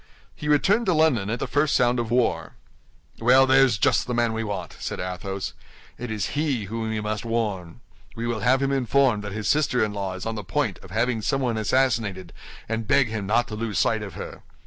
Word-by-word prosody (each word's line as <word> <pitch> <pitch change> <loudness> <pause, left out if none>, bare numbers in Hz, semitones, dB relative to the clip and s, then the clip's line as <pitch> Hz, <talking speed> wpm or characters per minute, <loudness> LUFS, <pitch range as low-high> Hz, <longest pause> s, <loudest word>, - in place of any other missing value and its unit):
"He 150 - -6
returned 195 +10 +3
to 180 - +3
London 140 -11 +2
at 115 - -1
the - - -3
first 145 0 +1
sound 120 0 +3
of 115 -2 -2
war." 120 0 0 0.7
"Well, 125 +3 +6
there's 130 -4 +4
just - - +2
the 125 - -2
man 120 -1 +1
we 115 0 -2
want," 100 -3 -5
said - - -4
Athos. 90 +1 -4 0.5
"It 125 0 -5
is 105 -3 -2
he 145 -6 0
whom 110 +2 -4
we 110 -1 -2
must 105 -1 -3
warn. 110 -5 -3 0.3
We 115 0 -4
will 120 -2 -1
have 130 +6 +2
him 135 - +1
informed 130 -4 +2
that 105 - -5
his 105 +1 -4
sister 140 -6 +2
in 105 - -5
law 100 -2 -3
is 95 - -7
on 115 - -2
the 105 -2 -5
point 90 - -1
of 95 - -14
having 115 +3 0
someone 130 -1 0
assassinated, 110 -6 0 0.3
and 110 0 -3
beg 140 -3 +3
him 105 -3 -4
not 115 +3 +2
to 105 - -5
lose 110 -2 -3
sight - - +2
of - - -7
her. - - -8
115 Hz, 215 wpm, -24 LUFS, 105-130 Hz, 0.7 s, Well